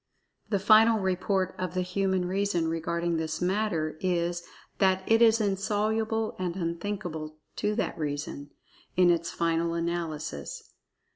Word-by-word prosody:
The 205 - +2
final 220 +3 +6
report 185 0 0
of 185 -1 -3
the 185 - +1
human 185 0 0
reason 190 -3 0
regarding 170 +1 -1
this 160 0 -2
matter 180 -5 0
is 175 -1 0 0.4
that 190 -1 +3
it 225 +1 +4
is 230 -1 +6
insoluble 215 +2 0
and 180 -2 -2
unthinkable 170 -3 -4 0.2
to 210 0 0
that 220 - -2
reason, 145 -1 -4 0.5
in 180 -1 +6
its 170 -1 0
final 165 0 0
analysis. 165 - -4
180 Hz, 130 wpm, -28 LUFS, 165-200 Hz, 0.5 s, final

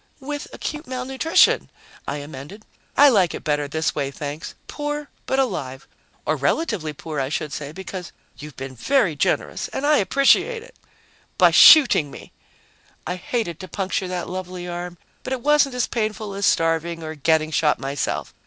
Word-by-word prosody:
"With 290 +2 -5
acute 300 +1 -6
malnutrition," 260 +5 +2 0.4
I 140 - -2
amended. 145 +8 -9 0.3
"I 285 +1 +8
like 195 -9 +3
it - - -8
better 145 -1 0
this 160 +2 -1
way, 140 -2 -2
thanks 145 +2 -6
poor, 295 0 -4 0.2
but 265 - 0
alive. 145 - -2 0.4
Or - - +1
relatively 215 - -1
poor, 150 0 -6
I 135 0 -1
should 150 -1 -3
say, 145 -1 -5
because 185 0 -7 0.2
you've 150 +1 -10
been 135 +1 -7
very 190 - +1
generous - - -1
and 275 - -4
I 300 0 +5
appreciate 275 - +3
it." - - -16 0.6
"By - - +6
shooting 265 - +8
me!" - - -12 0.7
"I 180 - -2
hated 180 -3 -3
to 185 - -8
puncture 190 +1 -2
that 180 -1 -4
lovely 180 -1 -6
arm, 175 0 -6 0.2
but 260 - -4
it 255 - -3
wasn't 290 -1 +3
as 250 - +1
painful 215 -2 -3
as 200 0 0
starving 165 0 +1
or 155 0 -5
getting 155 +1 +1
shot 155 -1 +2
myself. 135 +1 -3
180 Hz, 165 wpm, -22 LUFS, -, 0.7 s, I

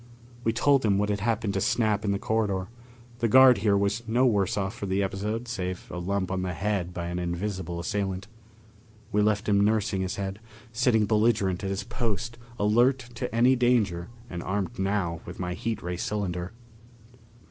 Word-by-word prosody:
We 115 - +2
told 135 +4 +3
him 100 -3 +3
what 105 +1 +1
had 100 -1 0
happened 110 -1 0
to 95 - 0
Snap 105 0 +1
in 100 - +1
the 100 - +1
corridor; 100 -3 -1 0.5
the 120 - +2
guard 130 +1 +7
here 100 -2 +3
was 100 +3 0
no 120 +4 +3
worse 100 -7 +2
off 95 0 -1
for 110 -4 -5
the 95 +1 +1
episode, 105 +5 -3
save 95 -6 -4
a 90 - -4
lump 95 +1 -1
on 95 -1 -1
the 90 -1 -2
head 95 -2 -1
by 90 -1 -4
an 90 +1 -3
invisible 90 0 -3
assailant. 95 0 -2 0.9
We 105 - +2
left 105 +1 +1
him 100 -1 +4
nursing 105 -2 +1
his 95 -1 -2
head, 100 0 -4 0.3
sitting 115 -2 +3
belligerent 105 -4 +2
at 95 - -1
his 95 0 -2
post, 120 0 -3 0.2
alert 120 +6 +4 0.2
to 120 - -4
any 120 +3 +4
danger 110 -9 +1 0.2
and 85 -5 -6
armed 100 +5 -3
now 95 -4 -1
with - - -8
my 90 -1 -2
heat 110 +2 -3
ray 90 0 -3
cylinder. 90 -2 -3
100 Hz, 185 wpm, -27 LUFS, 95-110 Hz, 0.9 s, guard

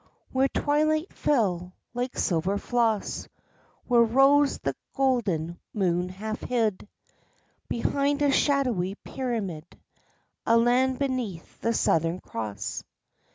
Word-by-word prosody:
Where 265 +1 +3
twilight 310 +4 +1
fell 185 -10 0 0.2
like 250 +1 -3
silver 185 +3 +1
floss, 225 -2 0 0.6
where 240 -2 +4
rose 270 +5 +4
the - - -3 0.2
golden 200 - 0 0.2
moon 180 -3 +1
half 215 +4 -5
hid 220 -5 -1 0.8
Behind 280 +4 0
a 285 - +4
shadowy 250 -10 +1
pyramid; 210 - -5 0.7
a 230 - +4
land 250 +2 +3
beneath 250 -11 -3
the 230 0 +1
Southern 165 0 +2
Cross. 110 - -5
230 Hz, 105 wpm, -27 LUFS, 185-265 Hz, 0.8 s, where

